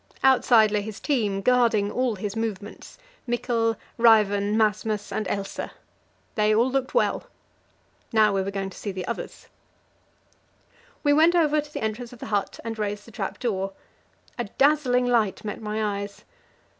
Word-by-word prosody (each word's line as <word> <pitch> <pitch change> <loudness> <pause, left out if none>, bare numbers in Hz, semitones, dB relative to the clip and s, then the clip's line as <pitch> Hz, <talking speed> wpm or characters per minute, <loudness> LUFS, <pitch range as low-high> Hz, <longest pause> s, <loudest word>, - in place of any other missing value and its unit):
Outside 245 -5 +5
lay 210 -1 +1
his 215 0 -7
team, 210 -9 0
guarding 230 -4 +3
all 250 -3 0
his 205 +1 -5
movements 215 -2 -5 0.3
Mikkel, 235 -1 0 0.2
Ræven, 210 -3 +4
Masmas, 215 -1 0
and 215 - -2
Else. 195 +1 -4 0.7
They 215 0 +2
all 240 +4 +3
looked 270 - -1
well. - - +1 0.9
Now 215 -2 +4
we 195 - +1
were 190 - -3
going 195 -1 -4
to - - -13
see 205 - -4
the 185 -1 -5
others. 235 - -6 1.6
We 290 -1 +4
went 325 +4 +5
over 305 -3 +3
to 295 0 -14
the - - -5
entrance 220 +2 -3
of 245 - -11
the - - -8
hut 200 -1 -1
and 225 -1 -4
raised 205 0 -3
the 230 - -14
trap 200 -2 -4
door; 195 -5 -2 0.7
a 240 - -1
dazzling 270 0 +2
light 225 -5 +1
met 210 - -5
my 210 -1 -2
eyes. 200 0 -8
220 Hz, 160 wpm, -25 LUFS, 205-245 Hz, 1.6 s, Outside